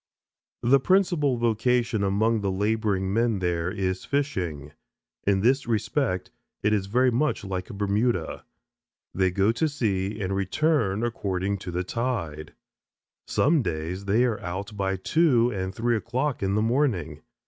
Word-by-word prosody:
The 135 +3 +5
principal 170 -5 +2
vocation 120 0 +1
among 110 +3 +1
the 100 - 0
laboring 100 -1 0
men 115 -1 +2
there 90 -2 -1
is 95 -1 -2
fishing. 90 - -2 0.6
In 100 -1 +3
this 130 +4 +2
respect 115 -2 -1 0.3
it 105 +1 +3
is 100 -2 0
very 125 +5 +3
much 145 +2 0
like 95 -2 -4
Bermuda. 100 -2 -1 0.7
They 95 0 +2
go 100 +4 +2
to 155 +7 0
sea 105 -7 -1
and 95 -1 -2
return 110 - +1
according 100 -4 -2
to 90 - -7
the 90 +1 -1
tide. 90 -10 -3 0.7
Some 150 +2 +3
days 85 +1 -4
they 105 +5 +3
are 115 -4 -1
out 95 +4 -5
by 95 -1 -1
two 125 - +3
and 95 -3 -3
three 120 +1 +1
o'clock 125 +5 -2
in 100 0 0
the 105 - +2
morning. 110 - 0
105 Hz, 145 wpm, -26 LUFS, 95-120 Hz, 0.7 s, The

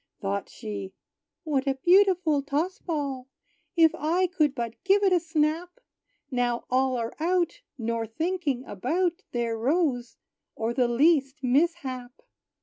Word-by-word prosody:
Thought 200 0 -3
she, 200 -4 -6 0.5
"What 285 -4 -1
a 270 - +2
beautiful 355 -1 +4
toss 315 +8 -2
ball! 280 -6 -3 0.5
If 325 -2 +5
I 340 +5 +1
could 310 -6 +1
but 235 -2 -5
give 400 +2 +4
it 385 -2 +4
a 355 - +5
snap, 325 +4 -1 0.5
Now 245 -1 0
all 260 0 +2
are 230 -1 -3
out, 345 +1 0 0.2
nor 230 -1 -2
thinking 300 - -2
about 330 - -1
Their 235 -2 -1
rose, 250 0 0 0.4
or 225 +1 -2
the 250 -1 +2
least 275 +2 +2
mishap!" 260 -3 0
280 Hz, 135 wpm, -27 LUFS, 245-340 Hz, 0.5 s, If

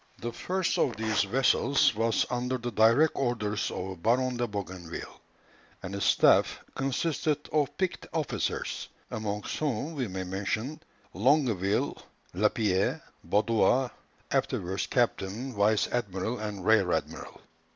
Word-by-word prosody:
The 120 - -4
first 180 +9 -1
of 120 - +2
these 110 -1 +1
vessels 135 +4 +3
was 115 +1 +1
under 125 +1 -1
the 120 0 -4
direct 115 +9 +5
orders 110 -5 -1
of 95 -2 -5
Baron 125 +4 +2
de 120 0 -1
Bougainville, 95 -5 -7 0.6
and 90 - -5
his 100 - -1
staff - - +4
consisted 145 +2 -1
of 150 -3 +1
picked 185 -2 -2
officers, 160 -3 -2 0.2
amongst 105 -1 -3
whom 145 +1 -2
we 135 -6 -2
may 95 -1 -4
mention 105 +9 -3 0.3
Longueville, 110 - +1 0.3
Lapierre, 100 0 +1 0.2
and - - -19
Baudin, 115 +4 +3 0.4
afterwards 95 +2 -1
captain, 120 +1 -1
vice 105 0 +3
admiral, 110 0 -2
and 105 -3 -5
rear 105 -5 +4
admiral. - - -4
110 Hz, 125 wpm, -29 LUFS, 100-130 Hz, 0.6 s, direct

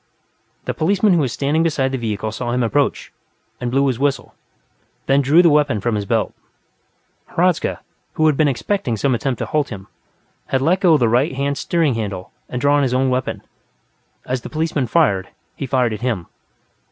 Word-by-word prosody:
The - - -2
policeman 195 +4 +2
who 170 - +3
was 135 -5 0
standing 145 +5 0
beside 145 -5 +1
the 135 - -1
vehicle 110 -2 -3
saw 120 +2 -3
him 125 0 +1
approach, 140 +5 0 0.5
and 125 - -2
blew 135 +3 +2
his 130 -3 0
whistle, 140 0 -1 0.7
then 135 +1 +3
drew 150 +6 +5
the 170 - +6
weapon 145 -7 +2
from 115 +4 -1
his 105 -1 -2
belt. - - 0 1.0
Hradzka, 180 0 +1 0.3
who 155 - +1
had 155 -2 +4
been 155 +1 +3
expecting 130 - -1
some 130 +5 +1
attempt 125 +1 -1
to - - -3
halt 150 -2 -1
him, 95 -4 -8 0.6
had 135 - +1
let 165 +8 +2
go 170 -4 +5
the 120 -4 +2
right 130 +5 +1
hand 140 +1 -1
steering 165 -6 +1
handle 100 -5 -5 0.2
and 125 - -3
drawn 145 +2 +3
his 130 -2 +1
own 130 0 +2
weapon; 130 0 -2 0.8
as 125 0 -2
the - - -8
policeman 155 -3 -1
drew, 115 - +2 0.3
he 140 - -5
fired 125 -3 +1
at 105 - -6
him. 115 -9 -2
135 Hz, 190 wpm, -19 LUFS, 120-155 Hz, 1.0 s, the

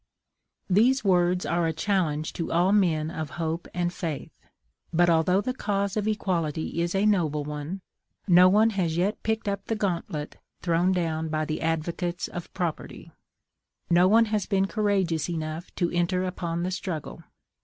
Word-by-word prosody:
These 230 +8 +3
words 180 -2 +2
are 170 -1 +1
a 160 - -1
challenge 160 -4 -1
to 165 - -4
all 175 +3 +3
men 165 -6 +2
of 160 -3 -4
hope 165 +1 -2
and 175 0 -1
faith; 160 -6 -4 0.6
but, 175 +1 +4
although 175 +4 +3
the 255 +5 -2
cause 200 -5 -1
of 215 -1 -1
equality 170 -6 -1
is 170 +2 -1
a 195 +2 +2
noble 160 -8 +2
one, 150 +6 -5 0.5
no 180 0 +7
one 215 +4 +4
has 175 -5 -1
yet 195 +5 0
picked 220 0 -2
up 200 -1 -2
the 225 - -1
gauntlet 170 -7 -3 0.3
thrown 175 +1 +2
down 160 -3 -1
by 155 0 -1
the 155 0 -3
advocates 170 +2 -2
of 175 -1 -8
property; 175 -4 -4 0.8
no 175 +2 +6
one 225 +3 +5
has 210 -3 -1
been 195 -2 +2
courageous 195 -6 0
enough 160 0 -4
to 175 -2 0
enter 175 +1 +1
upon 170 -2 -3
the 185 - -1
struggle. 170 -4 -5
175 Hz, 165 wpm, -26 LUFS, 165-195 Hz, 0.8 s, no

